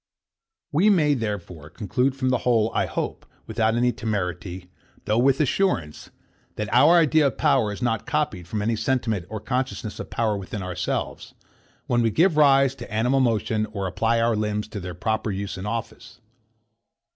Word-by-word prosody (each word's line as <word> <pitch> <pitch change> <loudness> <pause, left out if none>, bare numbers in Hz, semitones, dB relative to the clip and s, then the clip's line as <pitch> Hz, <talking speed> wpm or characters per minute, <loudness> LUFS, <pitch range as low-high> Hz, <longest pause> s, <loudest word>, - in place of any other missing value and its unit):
We 175 +8 +4
may, 155 -7 +4
therefore, 95 - -5
conclude 125 - -1
from 130 -1 -1
the 125 -1 +1
whole, 115 -3 +2
I - - +1
hope, - - -4 0.2
without 110 -1 0
any 125 +1 +2
temerity, 90 -5 -4 0.3
though 110 +2 +1
with 135 +2 +3
assurance; 140 - 0 0.5
that 105 -1 -4
our 145 +8 +6
idea 155 -2 +4
of 130 - -4
power 105 -2 +2
is 105 +4 -6
not 115 -3 -1
copied 145 - -1
from 105 +3 -3
any 115 +2 +1
sentiment 110 -5 -1
or 110 - -5
consciousness 125 -2 -3
of - - -6
power 110 -2 0
within 100 0 -5
ourselves, 90 -1 -4 0.5
when 120 -1 +1
we 115 - +2
give 165 - +3
rise 135 -3 +5
to 120 -5 -9
animal 120 +5 +2
motion, 110 -3 +1
or 100 -2 -5
apply 115 +5 +1
our 115 0 +2
limbs 105 0 -2
to 105 - -6
their 90 -1 -7
proper 110 +4 -1
use 100 0 -4
and 95 +2 -6
office. 115 +1 -6
115 Hz, 170 wpm, -24 LUFS, 105-130 Hz, 0.5 s, our